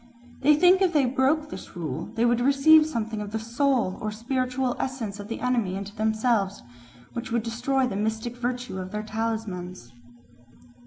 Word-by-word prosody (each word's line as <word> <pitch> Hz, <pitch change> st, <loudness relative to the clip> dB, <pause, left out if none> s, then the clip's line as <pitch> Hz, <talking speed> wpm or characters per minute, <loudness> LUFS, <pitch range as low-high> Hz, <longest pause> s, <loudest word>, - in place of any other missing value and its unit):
They 295 Hz, +2 st, +5 dB
think 360 Hz, +4 st, +5 dB
that 390 Hz, -, +4 dB
if 345 Hz, -, -7 dB
they 290 Hz, -4 st, +4 dB
broke 275 Hz, +4 st, +1 dB
this -, -, -9 dB
rule 155 Hz, -7 st, -4 dB
they 230 Hz, +2 st, +2 dB
would 240 Hz, 0 st, +2 dB
receive 280 Hz, +4 st, +6 dB
something 225 Hz, -6 st, -3 dB
of 205 Hz, -, -5 dB
the 220 Hz, -, -2 dB
soul 230 Hz, -2 st, 0 dB
or 215 Hz, -1 st, -2 dB
spiritual 255 Hz, +3 st, -1 dB
essence 230 Hz, -6 st, -3 dB
of 205 Hz, -, -7 dB
the 230 Hz, -, -5 dB
enemy 235 Hz, -7 st, 0 dB
into 200 Hz, +2 st, -6 dB
themselves, 220 Hz, -2 st, 0 dB, 0.5 s
which 235 Hz, 0 st, -5 dB
would 235 Hz, -1 st, +1 dB
destroy 245 Hz, +4 st, 0 dB
the 245 Hz, -, -3 dB
mystic 220 Hz, +3 st, -2 dB
virtue 245 Hz, -4 st, -3 dB
of 185 Hz, 0 st, -5 dB
their 210 Hz, 0 st, -3 dB
talismans. 215 Hz, -, -4 dB
235 Hz, 175 wpm, -26 LUFS, 210-260 Hz, 0.5 s, receive